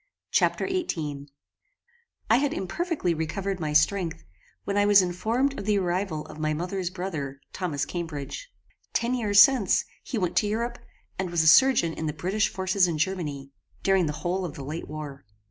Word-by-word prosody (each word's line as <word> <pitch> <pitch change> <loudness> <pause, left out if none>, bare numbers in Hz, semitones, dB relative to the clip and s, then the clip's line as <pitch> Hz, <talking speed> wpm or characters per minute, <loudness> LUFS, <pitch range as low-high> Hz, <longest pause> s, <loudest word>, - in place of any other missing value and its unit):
Chapter - - +2
XVIII 155 - -3 1.0
I 225 - +5
had 285 +2 +1
imperfectly 195 - -1
recovered 185 +5 -3
my 155 -2 -2
strength, 160 - +1 0.4
when 200 - -2
I 205 - +4
was 205 -2 +6
informed 225 +10 0
of 195 - -6
the 210 -1 +3
arrival 180 -4 -1
of - - -11
my 155 0 0
mother's 180 +2 -2
brother, 160 -8 -5
Thomas 165 -7 -2
Cambridge. 170 - -5 0.4
Ten 235 +2 +1
years 210 -5 +3
since, 235 -3 +5 0.2
he 255 - -4
went 180 -4 -1
to 210 - +3
Europe, 235 +3 -2 0.4
and 190 -1 -1
was 170 -2 +2
a - - +2
surgeon 180 -2 +6
in 160 - -4
the 150 - -2
British 185 +8 0
forces 190 0 +1
in 165 -2 -2
Germany, 150 -5 -2 0.3
during 190 -3 +3
the 150 - -2
whole 185 +2 0
of 170 -5 -5
the 140 - -7
late 155 +4 -5
war. 145 -2 -7
180 Hz, 175 wpm, -26 LUFS, 155-205 Hz, 1.0 s, was